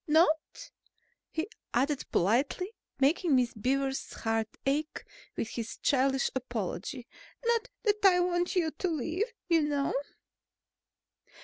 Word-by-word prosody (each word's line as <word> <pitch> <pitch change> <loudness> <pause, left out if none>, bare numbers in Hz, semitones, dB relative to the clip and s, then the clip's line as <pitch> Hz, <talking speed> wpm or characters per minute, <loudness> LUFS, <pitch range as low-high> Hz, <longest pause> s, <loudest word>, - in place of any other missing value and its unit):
Not," 315 0 +2 0.6
he 320 +4 -2 0.3
added 275 +3 +1
politely, 270 - +2 0.3
making 295 +2 +3
Miss 250 -2 +2
Beaver's 270 +4 -1
heart 225 0 0 0.2
ache 295 +3 -1 0.3
with 225 - -2
his 230 -2 -5
childish 270 0 +2
apology, 240 - -4 0.4
"not 470 +1 +2
that 420 -2 +1
I 370 -2 +7
want 355 +1 +1
you 330 -3 +2
to 370 - -2
leave, 330 - -1 0.2
you 335 -2 +4
know." 290 -2 0
290 Hz, 115 wpm, -30 LUFS, 255-350 Hz, 0.6 s, I